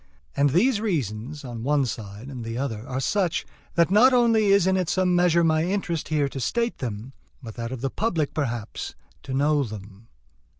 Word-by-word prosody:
And 140 +1 +3
these 205 - +2
reasons, 145 - -3
on 120 -2 -6
one 140 +2 +2
side 105 0 -6
and 130 -4 -7
the 115 +1 -5
other, 120 -4 -4
are 130 0 -3
such, 180 +5 0 0.3
that 170 +1 +3
not 245 +6 +6
only 230 -3 +4
is 200 -2 +5
it 190 0 +3
in 185 -2 0
some 185 0 +2
measure 175 -1 +4
my 160 -1 +3
interest 180 -4 -2
here 150 -2 +1
to 135 - -6
state 235 - -1
them, 120 +1 -5 0.3
but 115 -2 -7
that 115 +1 -5
of 130 -3 -5
the 135 -1 -2
public, 170 -9 -1
perhaps, 120 -7 -4 0.3
to - - -8
know 145 +2 +3
them. 105 -1 -9
145 Hz, 195 wpm, -25 LUFS, 120-180 Hz, 0.3 s, not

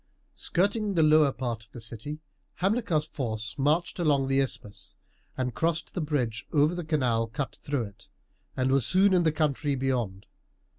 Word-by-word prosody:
Skirting 200 +2 0
the 160 - +4
lower 155 -2 +5
part 120 -4 -4
of 120 - -24
the 120 - -8
city, 115 +7 -6 0.3
Hamilcar's 190 -5 +1
force 110 -7 -4
marched 155 +7 +1
along 145 -5 +2
the 135 0 +3
isthmus 115 -6 -4 0.4
and 125 -2 -1
crossed 160 +6 -1
the 180 - -2
bridge 125 -8 -1
over 150 +2 +3
the 175 0 -4
canal 125 -8 +1
cut 130 +4 -4
through 145 -4 -1
it, 100 -2 -11 0.5
and 130 0 +1
was 135 -1 +3
soon 190 - +4
in 180 - +5
the 160 -2 +3
country 150 -2 0
beyond. 120 -8 -2
145 Hz, 165 wpm, -28 LUFS, 120-160 Hz, 0.5 s, lower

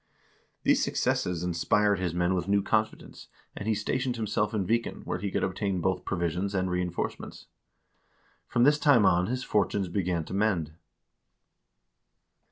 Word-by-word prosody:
These - - +3
successes 90 -2 0
inspired 100 +4 +1
his 90 -2 -1
men 90 +2 +1
with 90 -1 -2
new 100 0 +2
confidence, 110 0 -2 0.3
and 100 - -6
he 110 - +2
stationed 125 +4 -1
himself 105 -2 -1
in 105 -4 -1
Viken, 115 +4 -1
where - - -3
he 100 - -2
could - - -1
obtain 95 0 -1
both 95 0 -1
provisions 90 +3 -2
and 95 -1 0
reenforcements. 90 -1 -3 1.0
From 120 - +2
this 150 +3 +5
time 135 -9 +5
on 90 +1 +3
his 125 +2 -2
fortunes 100 -2 0
began 90 -3 -1
to - - -8
mend. 95 -7 0
100 Hz, 150 wpm, -28 LUFS, 90-110 Hz, 1.0 s, this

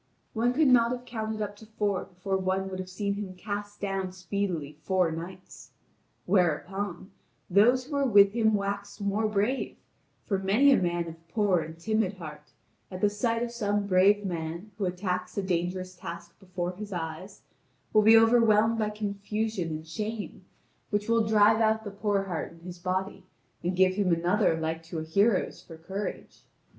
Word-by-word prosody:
One 235 +2 +2
could 295 +4 +3
not 240 -2 +5
have 250 0 -4
counted 220 -2 -3
up 205 0 -5
to 220 - -14
four 205 -3 -1
before 190 +1 -3
one 190 0 -1
would 185 - -5
have 185 0 -5
seen 200 +2 -2
him 200 -2 -6
cast 205 +2 -5
down 195 -2 -2
speedily 180 -6 -3
four 185 -3 +1
knights. 175 +3 -9 0.5
Whereupon, 185 +1 0 0.4
those 245 +7 +5
who 295 - -14
were 280 -1 +2
with 200 -3 +7
him 220 -2 +3
waxed 200 0 -3
more 205 +2 0
brave, 215 +5 -1 0.5
for 195 -4 0
many 215 +9 +4
a 265 - +6
man 175 -1 0
of 165 0 -11
poor 200 -1 +2
and 160 0 -7
timid 215 +2 0
heart, 150 -4 -10 0.4
at 185 - -7
the 205 - +3
sight 230 +2 0
of 240 - -3
some 205 -3 -1
brave 200 +2 +4
man 170 +3 -4
who 200 - 0
attacks 180 0 -3
a 200 - 0
dangerous 185 0 -2
task 170 -1 -8
before 180 -2 -4
his 210 +1 -7
eyes, 175 +2 -6 0.5
will 215 - +6
be 220 +2 +8
overwhelmed 225 -1 +4
by 215 -1 +1
confusion 210 -2 -3
and 155 0 -6
shame, 215 +5 -5 0.5
which 205 0 -1
will 230 -1 +3
drive 215 +1 +5
out 220 0 +2
the 205 - -6
poor 200 -1 0
heart 180 -4 -4
in 165 - -17
his 175 0 -9
body 190 +1 -2 0.4
and 180 +2 -1
give 185 0 +4
him 190 -2 +1
another 175 +1 +2
like 160 0 -2
to 165 +1 -7
a 155 - -2
hero's 200 +6 +1
for 165 - -12
courage. 190 +5 -6
200 Hz, 175 wpm, -28 LUFS, 180-215 Hz, 0.5 s, be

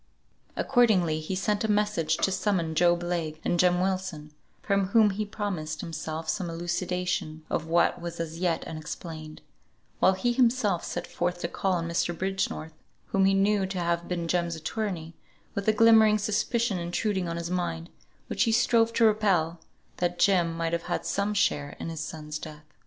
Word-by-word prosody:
Accordingly 205 -11 +3
he 155 +4 -4
sent 205 +3 0
a 220 - -1
message 205 -7 +1
to 195 - +1
summon 185 -4 0
Job 175 +1 +3
Legh 170 -3 -2
and 175 - +1
Jem 180 0 +4
Wilson, 185 -5 -3 0.3
from 200 -2 +1
whom 210 +1 +5
he 210 +2 -2
promised 170 -8 -4
himself 160 -1 -5
some 175 +2 -1
elucidation 175 -1 -2
of 160 - -1
what 170 +1 +2
was 170 0 -6
as 165 0 -4
yet 175 -2 0
unexplained; 155 0 -7 0.6
while 190 - +5
he 240 +6 0
himself 235 -7 +2
set - - -4
forth 175 0 -2
to - - -1
call 190 +2 -1
on 170 -2 -1
Mr. 170 0 -1
Bridgenorth, 190 -4 -2 0.4
whom 195 0 +3
he 195 0 +4
knew 195 0 +2
to 190 0 -5
have 170 -1 -1
been 170 -2 -2
Jem's 170 -1 0
attorney, 165 0 -4 0.4
with 200 +1 -4
a - - +7
glimmering 220 -1 +6
suspicion 215 0 0
intruding 180 +2 -1
on 165 - -3
his 170 +1 -4
mind, 175 -2 -2 0.3
which - - 0
he 225 - +2
strove 230 0 +3
to 230 - +4
repel, 195 -7 +2 0.4
that 175 0 -1
Jem 175 -4 +3
might 165 0 -1
have 170 - -2
had - - -1
some 200 +1 -1
share 145 -7 0
in - - -4
his 165 -1 -5
son's 150 -1 -6
death. 150 -1 -9
175 Hz, 175 wpm, -27 LUFS, 165-200 Hz, 0.6 s, a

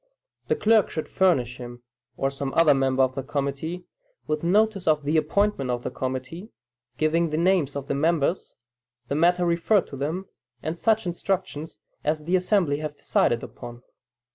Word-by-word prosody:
The - - +2
clerk 220 -2 +3
should 155 - -4
furnish 130 -10 +1
him, 120 -1 -9 0.3
or 135 - 0
some 135 0 -4
other 165 -3 +6
member 135 -1 +2
of 130 0 +1
the 135 - -3
committee, 140 +6 -3 0.4
with 155 +1 -2
notice 200 +1 +2
of 155 -2 +3
the 150 +3 0
appointment 155 -2 +1
of 120 -1 -2
the - - -3
committee, 130 - -5 0.5
giving 165 +2 +2
the 155 - -2
names 170 -5 +2
of 140 -1 -4
the - - -2
members, 160 +3 0 0.5
the 140 - -1
matter 175 +3 +3
referred 175 +4 +2
to - - -7
them, 160 +8 -3 0.4
and 160 - -2
such 220 +4 +1
instructions 175 -3 -3 0.2
as 155 +1 -1
the 175 +4 +1
assembly 180 -5 +2
have 150 -1 -5
decided 120 0 +1
upon. 120 0 -10
155 Hz, 165 wpm, -25 LUFS, 140-180 Hz, 0.5 s, other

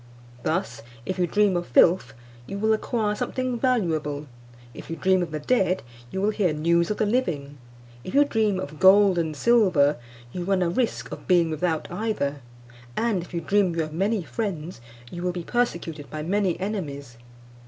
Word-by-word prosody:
Thus, 165 +8 -2 0.2
if 185 0 -3
you 175 - +2
dream 205 0 +2
of 175 0 -2
filth, 175 +9 +4 0.3
you 195 - -5
will 220 +2 +2
acquire 215 -1 0
something 255 +3 -2
valuable; 160 - 0 0.5
if - - -11
you 165 - -3
dream 185 +1 +2
of 175 - -2
the 155 - -4
dead, 190 +1 +1 0.3
you 190 - -4
will 210 - +3
hear 190 -7 +1
news 170 +3 +2
of 210 - -1
the 215 - +1
living; 155 - -1 0.4
if 185 - -6
you 290 +1 +6
dream 215 -7 +1
of 150 -3 -7
gold 190 -1 +6
and 160 -2 -2
silver, 180 - +4 0.3
you 180 - -4
run 190 0 +1
a 170 - 0
risk 235 +5 -1
of - - -8
being 175 -3 +3
without 160 0 -1
either; 145 -11 -2 0.6
and 225 -5 +1
if 175 - -11
you 170 -1 -3
dream 195 -3 +2
you 165 - +1
have 155 0 -7
many 195 +4 0
friends, 170 - -4 0.3
you 175 - -6
will 180 0 0
be 175 -1 -5
persecuted 170 -10 -2
by 155 0 -5
many 190 0 0
enemies. 145 - -5
180 Hz, 185 wpm, -25 LUFS, 160-210 Hz, 0.6 s, you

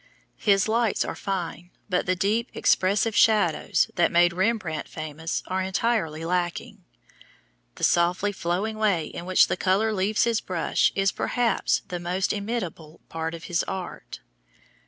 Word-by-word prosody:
His 195 -2 +3
lights 230 0 +1
are - - -4
fine 180 -3 -4 0.2
but 180 -3 0
the 185 - +2
deep, 215 +6 0
expressive 205 +4 +2
shadows 210 -8 +3
that 175 - +2
made 175 0 +4
Rembrandt 185 -5 -1
famous 155 +1 -5
are 185 +1 -2
entirely 190 -5 -1
lacking. 175 0 -2 0.9
The - - -10
softly 175 +4 +2
flowing 200 +4 -2
way 195 -7 +2
in 170 - -8
which 185 0 +5
the - - -2
color 200 +4 +1
leaves 205 +2 +1
his 230 -2 +1
brush 175 -3 +1
is, 195 0 +2
perhaps, 240 -4 0
the 180 - -4
most 180 +2 -1
inimitable 200 -7 -5
part 165 0 -4
of 165 - -10
his 175 0 0
art. 180 - -6
185 Hz, 145 wpm, -25 LUFS, 170-210 Hz, 0.9 s, which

